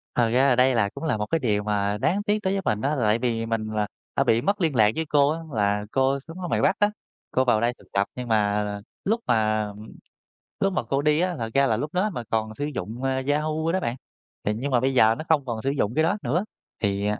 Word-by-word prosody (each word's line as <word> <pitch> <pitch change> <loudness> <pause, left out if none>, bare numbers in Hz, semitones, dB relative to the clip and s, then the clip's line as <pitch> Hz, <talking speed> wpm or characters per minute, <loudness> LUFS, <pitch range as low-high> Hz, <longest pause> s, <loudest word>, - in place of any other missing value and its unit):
Thật 120 -2 +3
ra 130 +4 +3
là 125 - +4
đây 130 +1 +4
là 100 -3 +2
cũng - - -9
là 150 -9 0
một 105 - -2
cái 165 +9 0
điều 105 -5 0
mà 105 -1 0
đáng 190 - 0
tiếc 210 0 +1
đối 190 +1 +1
với 195 - -1
mình 105 0 0
á, 145 +3 0
tại 110 -1 +2
vì 115 -2 -1
mình 115 -1 -2
là 105 -1 0 0.3
đã - - +3
bị 115 +1 +3
mất 200 +7 0
liên 160 -5 +1
lạc 105 -2 +5
với 160 - -1
cô 145 -1 +4
á, 160 +2 -1
là 105 -1 +1
cô 135 +1 +2
sống 165 +6 -10
ở 180 - -3
ngoài - - 0
Bắc 195 - +2
á, 205 0 +3 0.4
cô 130 0 +2
vào 110 -3 +3
đây 120 +1 +1
thực - - -21
tập 100 0 +1
nhưng 125 -1 -5
mà 105 -2 +2 0.4
lúc 225 +4 +1
mà, 110 -1 +2 0.9
lúc 195 -1 +1
mà - - 0
cô 135 +1 -1
đi 150 +1 +2
á, 180 0 0
thật 115 -1 -3
ra 140 0 +4
là 110 - +1
lúc 145 +7 -4
đó 195 +4 +1
mà 120 - -4
còn 110 -1 -1
sử 145 - -3
dụng, 120 -3 -5
a, 130 0 0
Yahoo 155 +2 0
đó 190 - +1
bạn. 120 -8 -2 0.5
Thì 105 - 0
nhưng 130 +5 -3
mà 125 - +4
bây 135 +1 +1
giờ 115 -2 +5
nó 155 - -6
không 145 -4 +3
còn 115 -3 -3
sử 135 - 0
dụng 125 -5 0
cái 155 - +3
đó 200 +6 +1
nữa 170 +11 0 0.4
thì, 100 -1 0
à, 105 - -1
125 Hz, 270 wpm, -25 LUFS, 110-155 Hz, 0.9 s, lạc